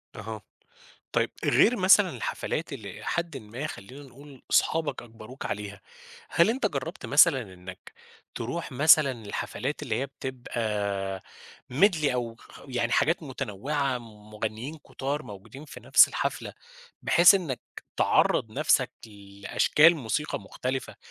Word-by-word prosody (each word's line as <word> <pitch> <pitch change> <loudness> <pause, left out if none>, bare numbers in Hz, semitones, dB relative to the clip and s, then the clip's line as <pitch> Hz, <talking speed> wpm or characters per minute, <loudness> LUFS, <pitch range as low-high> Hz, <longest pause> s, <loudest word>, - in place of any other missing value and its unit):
أها، - - -7 0.7
طيب - - +1
غير 245 - +4
مثلًا 190 -1 +5
الحفلات 160 -1 -4
اللي 105 -7 -7
إلى - - -11
حدٍ 170 -4 -2
ما 120 +5 -6
خلّينا 130 +1 -10
نقول 135 0 -15
أصحابك 160 -2 +1
أجبروك 115 +2 -10
عليها، 100 -1 -5 0.5
هل 170 +6 +4
أنت 260 +4 0
جرّبت - - -5
مثلًا 140 -7 +5
إنّك 90 +1 -12 0.4
تروح 135 +6 -5
مثلًا 145 0 +5
الحفلات 140 +7 -4
اللي 120 -6 -2
هي 135 - -2
بتبقى 105 -8 -4 0.5
Medley 165 +1 +3
أو 120 -2 -3
خ - - -19
خ - - -14
يعني 120 -2 -1
حاجات 165 +2 +2
متنوعة، 135 +1 -2
م 105 -2 -15
مغنيين 110 +8 -5
كُتار 145 +1 -4
موجودين 110 +6 -11
في 150 - -11
نَفْس - - +6
الحفلة، - - -3 0.5
بحيث 175 +3 +7
إنّك 160 -10 -2 0.4
تعرّض - - +2
نَفْسك - - +2 0.2
لأشكال 100 +10 +2
موسيقى 135 +3 -2
مختلفة، 130 +6 -5
130 Hz, 130 wpm, -27 LUFS, 110-150 Hz, 0.7 s, بحيث